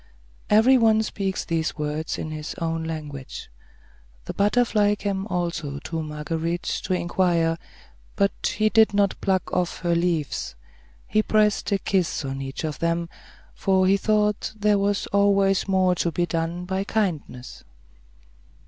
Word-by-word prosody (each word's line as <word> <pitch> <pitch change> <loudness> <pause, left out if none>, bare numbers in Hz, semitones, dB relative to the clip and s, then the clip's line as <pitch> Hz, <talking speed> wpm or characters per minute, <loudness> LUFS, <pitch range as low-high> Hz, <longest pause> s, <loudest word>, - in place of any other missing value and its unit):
Every 240 +5 +6
one 220 -1 +4
speaks 195 -3 -3
these 160 -2 -1
words 150 +1 -3
in 155 - -5
his 155 0 -6
own 165 -1 -2
language. 150 - -7 0.7
The - - -5
butterfly 210 -1 +2
came 200 -1 -3
also 170 -6 -2
to 160 +3 -4
Marguerite 160 +3 -3 0.2
to 185 - +1
inquire, 170 -2 +1 0.6
but 200 0 0
he 215 0 +3
did 220 -2 +4
not 200 -1 +1
pluck 190 -2 0
off 180 -1 -1
her 175 -1 +1
leaves; 170 - -1 0.5
he 215 - +2
pressed 215 -1 +2
a 200 - +3
kiss 185 -6 -1
on 135 0 -4
each 135 +2 -5
of 155 -2 -3
them, 170 0 0 0.4
for 190 -1 +2
he 190 +1 +4
thought 210 +1 +1
there 210 -1 +2
was 200 0 0
always 200 -1 +3
more 190 -1 +3
to 170 -1 -1
be 175 +2 0
done 170 +1 -3
by 190 +1 -1
kindness. 170 - -3
180 Hz, 145 wpm, -24 LUFS, 165-200 Hz, 0.7 s, Every